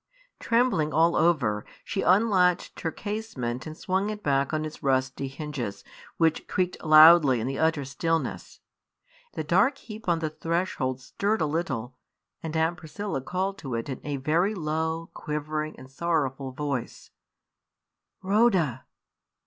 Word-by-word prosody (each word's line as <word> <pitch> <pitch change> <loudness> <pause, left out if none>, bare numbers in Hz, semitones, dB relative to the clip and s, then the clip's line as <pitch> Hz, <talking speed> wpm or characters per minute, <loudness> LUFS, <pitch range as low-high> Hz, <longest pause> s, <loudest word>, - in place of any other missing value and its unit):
Trembling 230 -10 +2
all 165 +3 +3
over, 125 -12 +2 0.2
she 195 - -2
unlatched 185 -2 +3
her 165 - -1
casement 160 - -4
and 155 0 -8
swung 190 +3 -1
it 210 -1 -6
back 140 -1 +1
on 155 -1 -1
its 155 - -8
rusty 135 0 0
hinges, 135 -8 -5 0.3
which 160 -2 +1
creaked 180 -1 -1
loudly 155 -4 +8
in 110 - -2
the 135 +1 -3
utter 160 -3 +1
stillness. 165 +4 -3 0.7
The - - -3
dark 275 0 +3
heap 215 -6 -8
on 170 - +3
the 160 -1 -3
threshold 160 -6 -2
stirred 205 +10 -1
a - - +2
little; 135 -6 -3 0.5
and 160 0 -3
Aunt 165 +2 +1
Priscilla 175 -1 -5
called 190 +7 -2
to 130 -4 -4
it 115 +4 -4
in 130 - -5
a 145 -1 -3
very 165 +10 +1
low, 160 0 -2
quivering, 155 +1 -4
and 130 - -12
sorrowful 135 -2 -1
voice 140 -2 -4 1.1
"Rhoda!" 190 - +2
155 Hz, 140 wpm, -27 LUFS, 135-180 Hz, 1.1 s, loudly